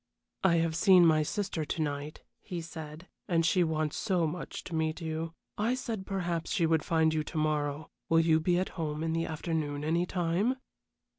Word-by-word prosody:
"I 185 Hz, -3 st, +5 dB
have 165 Hz, -1 st, +1 dB
seen 185 Hz, -1 st, +6 dB
my 155 Hz, -1 st, +5 dB
sister 175 Hz, +1 st, -2 dB
to 150 Hz, -, -4 dB
night," 145 Hz, 0 st, -4 dB, 0.2 s
he 180 Hz, -3 st, -5 dB
said, 160 Hz, +1 st, -8 dB, 0.2 s
"and 165 Hz, -2 st, +2 dB
she 180 Hz, +2 st, +4 dB
wants 155 Hz, -2 st, -1 dB
so 185 Hz, -5 st, +1 dB
much 165 Hz, +3 st, -5 dB
to 175 Hz, -, -8 dB
meet 160 Hz, 0 st, 0 dB
you. 165 Hz, 0 st, -4 dB, 0.2 s
I 230 Hz, +4 st, +2 dB
said 225 Hz, -6 st, -4 dB
perhaps 175 Hz, -4 st, -2 dB
she 175 Hz, -6 st, +2 dB
would 160 Hz, -2 st, +2 dB
find 160 Hz, -1 st, +2 dB
you 155 Hz, -1 st, 0 dB
to 160 Hz, -, -6 dB
morrow. 150 Hz, -1 st, -1 dB, 0.2 s
Will 165 Hz, 0 st, +5 dB
you 160 Hz, -1 st, +4 dB
be 175 Hz, +2 st, +2 dB
at 185 Hz, -, 0 dB
home 155 Hz, -2 st, -3 dB
in 165 Hz, 0 st, 0 dB
the 165 Hz, 0 st, 0 dB
afternoon 155 Hz, -2 st, -2 dB
any 170 Hz, +3 st, +1 dB
time?" 180 Hz, +8 st, +1 dB
165 Hz, 195 wpm, -30 LUFS, 155-175 Hz, 0.2 s, seen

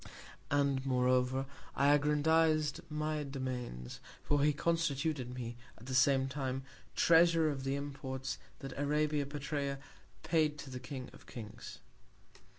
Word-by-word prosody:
And, 140 Hz, -2 st, +2 dB
moreover, 130 Hz, 0 st, +2 dB, 0.3 s
I 140 Hz, +1 st, +5 dB
aggrandiz'd 155 Hz, +1 st, +3 dB
my 150 Hz, 0 st, -1 dB
Domains; 130 Hz, -, -5 dB, 0.2 s
for 145 Hz, -1 st, +2 dB
he 150 Hz, -, +5 dB
constituted 150 Hz, -4 st, 0 dB
me, 120 Hz, -2 st, -5 dB, 0.2 s
at 115 Hz, -, -13 dB
the 130 Hz, -, -4 dB
same 130 Hz, +1 st, +4 dB
Time, 135 Hz, -1 st, -3 dB, 0.3 s
Treasurer 165 Hz, -1 st, +5 dB
of 135 Hz, -2 st, -4 dB
the 135 Hz, +1 st, 0 dB
Imports 135 Hz, -2 st, -4 dB, 0.2 s
that 135 Hz, -1 st, -6 dB
Arabia 150 Hz, 0 st, +1 dB
Petræa 140 Hz, -1 st, -2 dB, 0.5 s
paid 155 Hz, -3 st, +2 dB
to 140 Hz, -2 st, -8 dB
the 125 Hz, -, -5 dB
King 130 Hz, -1 st, -7 dB
of -, -, -16 dB
Kings. 115 Hz, 0 st, -9 dB
140 Hz, 130 wpm, -34 LUFS, 130-150 Hz, 0.5 s, I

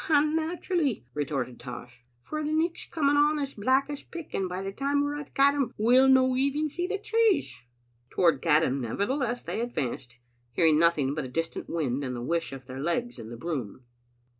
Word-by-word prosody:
"And 305 Hz, 0 st, +4 dB
naturally," 320 Hz, -, -1 dB
retorted 135 Hz, -4 st, -3 dB
Tosh, 125 Hz, -1 st, -9 dB, 0.2 s
"for 305 Hz, 0 st, -4 dB
the 300 Hz, -, -2 dB
nichfs 325 Hz, +2 st, -1 dB
coming 290 Hz, -3 st, +2 dB
on 300 Hz, +1 st, +4 dB
as 280 Hz, -2 st, -3 dB
black 260 Hz, +6 st, +2 dB
as 290 Hz, -1 st, -5 dB
pick, 335 Hz, -3 st, -9 dB
and 190 Hz, -1 st, -1 dB
by 185 Hz, +2 st, -4 dB
the 195 Hz, -, -3 dB
time 280 Hz, +6 st, 0 dB
we're 290 Hz, 0 st, -2 dB
at 290 Hz, -, -10 dB
Caddam 275 Hz, -2 st, +3 dB
we'll 250 Hz, +5 st, +5 dB
no 260 Hz, -1 st, +5 dB
even 280 Hz, +4 st, +1 dB
see 350 Hz, +5 st, -2 dB
the 410 Hz, -, -1 dB
trees." 440 Hz, -1 st, +1 dB, 0.5 s
Toward 170 Hz, -3 st, +2 dB
Caddam, 150 Hz, -4 st, +2 dB
nevertheless, 240 Hz, -, -1 dB
they -, -, -3 dB
advanced, 130 Hz, -, -4 dB, 0.4 s
hear 170 Hz, -, +2 dB
ing 155 Hz, -1 st, +5 dB
nothing 155 Hz, -5 st, +3 dB
but 150 Hz, -2 st, -3 dB
a -, -, -5 dB
distant 165 Hz, +6 st, -4 dB
wind 145 Hz, -5 st, -1 dB
and 125 Hz, -2 st, -3 dB
llie 120 Hz, -, -5 dB
whish 170 Hz, +3 st, -1 dB
of 135 Hz, -1 st, -9 dB
their 130 Hz, +1 st, -8 dB
legs 170 Hz, -, -2 dB
in 110 Hz, -1 st, -8 dB
the 120 Hz, -, -8 dB
broom. 130 Hz, -, -5 dB
235 Hz, 195 wpm, -28 LUFS, -, 0.5 s, we'll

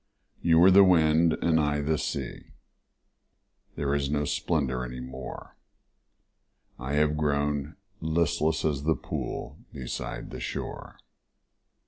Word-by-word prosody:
You 80 Hz, -1 st, +4 dB
were 90 Hz, +3 st, +7 dB
the 100 Hz, +1 st, +8 dB
wind 80 Hz, -2 st, +4 dB
and 80 Hz, -1 st, +3 dB
I 75 Hz, -1 st, +1 dB
the 80 Hz, +1 st, 0 dB
sea -, -, -5 dB, 1.2 s
There 70 Hz, -1 st, -1 dB
is 70 Hz, -1 st, 0 dB
no 75 Hz, 0 st, 0 dB
splendor 70 Hz, -6 st, -1 dB
any 60 Hz, 0 st, -6 dB
more, 65 Hz, +1 st, -8 dB, 1.2 s
I 65 Hz, +3 st, -4 dB
have 75 Hz, 0 st, +2 dB
grown 75 Hz, -1 st, -1 dB, 0.2 s
listless 80 Hz, -1 st, 0 dB
as 75 Hz, -3 st, 0 dB
the 80 Hz, +2 st, +1 dB
pool -, -, -5 dB
Beside 65 Hz, -2 st, -6 dB
the -, -, -6 dB
shore. -, -, -6 dB
75 Hz, 120 wpm, -27 LUFS, 70-80 Hz, 1.2 s, the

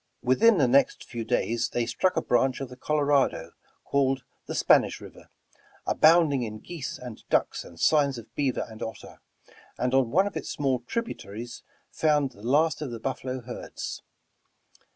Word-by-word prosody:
Within 210 Hz, -, +5 dB
the 140 Hz, -5 st, +4 dB
next 135 Hz, +3 st, +3 dB
few 120 Hz, -1 st, -6 dB
days 115 Hz, +1 st, 0 dB
they 120 Hz, -1 st, -1 dB
struck 120 Hz, +11 st, 0 dB
a -, -, +1 dB
branch 130 Hz, +1 st, +2 dB
of 135 Hz, -2 st, -5 dB
the 125 Hz, -, -10 dB
Colorado, 140 Hz, -, +1 dB, 0.3 s
called 135 Hz, -2 st, +1 dB, 0.2 s
the -, -, -4 dB
Spanish -, -, +3 dB
River, -, -, -13 dB, 0.6 s
abounding 155 Hz, -4 st, +4 dB
in 110 Hz, -2 st, -4 dB
geese 155 Hz, +4 st, -6 dB
and 125 Hz, -3 st, -9 dB
ducks -, -, +1 dB
and 85 Hz, -, -14 dB
signs 140 Hz, -4 st, +3 dB
of 115 Hz, -, -11 dB
beaver 135 Hz, -4 st, -1 dB
and 110 Hz, -1 st, -12 dB
otter, 110 Hz, -1 st, -7 dB, 0.6 s
and 125 Hz, 0 st, -1 dB
on 135 Hz, -3 st, +3 dB
one 185 Hz, +9 st, +3 dB
of 205 Hz, -, -4 dB
its -, -, -4 dB
small 135 Hz, -3 st, 0 dB
tributaries 120 Hz, -, -5 dB, 0.3 s
found 150 Hz, -3 st, +2 dB
the 100 Hz, -, -17 dB
last 150 Hz, +8 st, +2 dB
of 150 Hz, -, -3 dB
the 115 Hz, -1 st, -6 dB
buf 130 Hz, +3 st, -3 dB
falo 130 Hz, -1 st, -4 dB
herds. 120 Hz, -, -6 dB
130 Hz, 170 wpm, -27 LUFS, 120-145 Hz, 0.6 s, Within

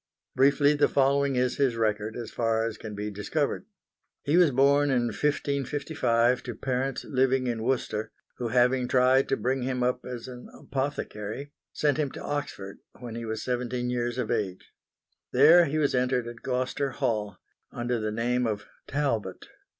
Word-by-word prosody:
Briefly 140 Hz, +2 st, +4 dB
the 145 Hz, 0 st, +3 dB
following 140 Hz, 0 st, +2 dB
is 125 Hz, 0 st, +1 dB
his 135 Hz, -5 st, +2 dB
record 110 Hz, -1 st, -1 dB
as 115 Hz, -2 st, -6 dB
far 115 Hz, -1 st, 0 dB
as 115 Hz, -1 st, -4 dB
can 110 Hz, -2 st, -7 dB
be 105 Hz, +1 st, -4 dB
discovered. 140 Hz, -, -2 dB, 0.6 s
He 145 Hz, -, +1 dB
was 175 Hz, -3 st, +6 dB
born 140 Hz, +2 st, +4 dB
in 125 Hz, -3 st, +2 dB
1555 140 Hz, -1 st, 0 dB
to 120 Hz, -3 st, -6 dB
parents 130 Hz, +2 st, -2 dB
living 130 Hz, -1 st, +1 dB
in 120 Hz, -2 st, -2 dB
Worcester, 110 Hz, -3 st, -1 dB, 0.3 s
who 120 Hz, -, -2 dB
having 125 Hz, +1 st, +2 dB
tried 130 Hz, +1 st, +3 dB
to -, -, +1 dB
bring 130 Hz, +1 st, -1 dB
him 125 Hz, 0 st, -1 dB
up 125 Hz, 0 st, 0 dB
as 125 Hz, -1 st, -7 dB
an 125 Hz, -1 st, -10 dB
apothecary, 135 Hz, -2 st, -4 dB, 0.2 s
sent 145 Hz, -2 st, +1 dB
him 145 Hz, -3 st, +1 dB
to -, -, -7 dB
Oxford 140 Hz, -9 st, -4 dB, 0.2 s
when 120 Hz, -3 st, -7 dB
he 115 Hz, 0 st, -5 dB
was 110 Hz, 0 st, -4 dB
seventeen 125 Hz, 0 st, -2 dB
years 120 Hz, 0 st, -2 dB
of 125 Hz, -, -2 dB
age. 100 Hz, -6 st, -3 dB, 0.6 s
There 160 Hz, +7 st, +7 dB
he 155 Hz, +1 st, -2 dB
was 145 Hz, -2 st, +2 dB
entered 125 Hz, -1 st, +1 dB
at 120 Hz, -1 st, -9 dB
Gloucester 130 Hz, +2 st, -1 dB
Hall, 105 Hz, -7 st, -1 dB, 0.3 s
under 120 Hz, 0 st, -2 dB
the 110 Hz, 0 st, -2 dB
name 120 Hz, +2 st, 0 dB
of 105 Hz, -2 st, -3 dB, 0.2 s
Talbot. 115 Hz, -10 st, -2 dB
125 Hz, 165 wpm, -27 LUFS, 115-140 Hz, 0.6 s, There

